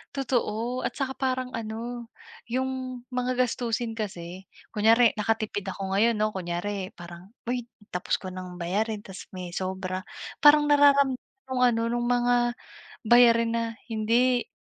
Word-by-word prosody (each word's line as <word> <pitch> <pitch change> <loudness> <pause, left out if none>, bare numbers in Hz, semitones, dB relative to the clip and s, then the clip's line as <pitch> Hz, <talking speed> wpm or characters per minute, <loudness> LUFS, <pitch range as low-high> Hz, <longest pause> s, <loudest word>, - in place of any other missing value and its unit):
Totoo, 245 -2 -1
at - - -2
saka 265 -2 -3
parang 255 -1 -1
ano, 230 +2 -5 0.4
yung 255 0 -3
mga 250 0 -1
gastusin 240 -2 -1
kasi, 185 -3 -6 0.2
kunyari 225 +2 +5
nakatipid 210 -1 -1
ako 190 0 -4
ngayon 220 +5 +3
'no, 215 0 +1
kunyari 190 +2 -4
parang, 175 +4 -12 0.2
"Uy, 245 -1 -1 0.2
tapos 180 - -2
ko 185 - -5
nang 180 -1 -8
bayarin, 210 +4 -1
'tas 190 -2 -10
may 180 -1 -6
sobra." 185 +1 -4 0.3
Parang 295 0 +6
nararamdam 280 -2 +5 0.3
yung 255 -1 -1
ano 230 -1 +2
nung 240 0 -1
mga 245 0 +2 0.5
bayarin 230 0 +5
na 230 0 0 0.2
hindi 235 +2 +1
230 Hz, 135 wpm, -27 LUFS, 195-250 Hz, 0.5 s, Parang